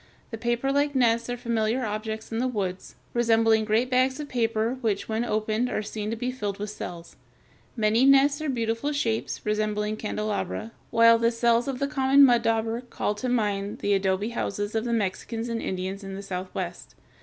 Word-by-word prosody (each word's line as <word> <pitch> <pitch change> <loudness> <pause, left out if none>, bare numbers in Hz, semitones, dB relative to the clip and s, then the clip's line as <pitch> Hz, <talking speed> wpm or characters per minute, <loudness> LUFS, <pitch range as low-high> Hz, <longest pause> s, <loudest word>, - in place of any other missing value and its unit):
The 225 - -4
paperlike 270 +5 0
nests 235 -2 +2
are 245 - -2
familiar 235 +1 0
objects 220 +1 -4
in 225 - -1
the 255 - +1
woods, 190 -6 -4 0.2
resembling 225 -2 +3
great 225 +4 +1
bags 260 +2 +2
of 295 - -5
paper 230 0 0
which 210 -4 -1
when 220 +1 -1
opened 220 +2 0
are 215 - -2
seen 210 0 -4
to 225 - -2
be 245 +2 -2
filled 205 -6 -4
with 210 0 -4
cells. 170 -5 -8 0.6
Many 220 +1 +3
nests 275 +2 +5
are 310 - -2
of 270 - -1
beautiful 230 +5 -1
shapes, 230 -6 -2
resembling 210 0 -1
candelabra, 215 0 -3 0.2
while 230 0 +6
the 230 0 +3
cells 235 +1 +2
of 270 -2 -2
the 280 - 0
common 275 -1 +5
mud 240 -3 +4
dauber 225 0 0
(Fig. 245 - -23
254) - - -21
call 205 - +1
to 230 +5 -4
mind 205 -4 0
the 205 - 0
adobe 195 +2 +1
houses 205 -3 -3
of 220 +1 -1
the 240 - -1
Mexicans 225 +2 -2
and 230 -1 -2
Indians 190 +2 -4
of 195 0 -6
the 200 - -7
Southwest. 185 -1 -5
225 Hz, 195 wpm, -26 LUFS, 210-245 Hz, 0.6 s, while